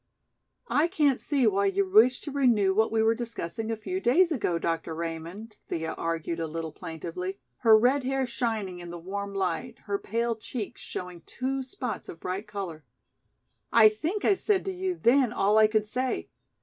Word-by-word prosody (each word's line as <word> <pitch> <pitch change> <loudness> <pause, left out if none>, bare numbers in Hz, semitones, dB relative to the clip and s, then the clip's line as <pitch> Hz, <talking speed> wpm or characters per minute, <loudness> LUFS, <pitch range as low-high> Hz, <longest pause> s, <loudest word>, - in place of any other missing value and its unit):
"I 305 -3 +3
can't 300 -8 +2
see 275 -4 +1
why 200 -2 +3
you 195 0 +1
wish 220 +6 +5
to 295 - -6
renew 235 -9 +3
what 220 +3 +2
we 220 0 +2
were 225 +1 +4
discussing 225 -2 -5
a 225 - 0
few 365 - -4
days 345 +4 +4
ago, 205 - 0
Dr. 165 -1 -2
Raymond," 170 +7 -6
Thea 160 -1 -3
argued 165 0 -3
a 165 - -2
little 160 0 -4
plaintively, 170 +5 -6 0.2
her 225 -3 +6
red 255 +5 +3
hair 265 +1 0
shining 220 -7 -2
in 175 0 -8
the 175 - -6
warm 200 +3 -5
light, 195 +5 -2
her 200 -1 -1
pale 230 +2 -1
cheeks 220 -1 -6
showing 180 -2 -7
two 265 +2 -2
spots 250 -5 -5
of 165 - -9
bright 190 +5 -4
color. 190 -7 -6 0.9
"I 220 -2 +8
think 320 - -3
I - - +6
said 390 0 +1
to 385 - -1
you 370 0 -2
then 250 -3 +3
all 210 -2 +3
I 215 - +7
could 215 -1 +1
say. 255 +4 -2
215 Hz, 185 wpm, -28 LUFS, 185-255 Hz, 0.9 s, I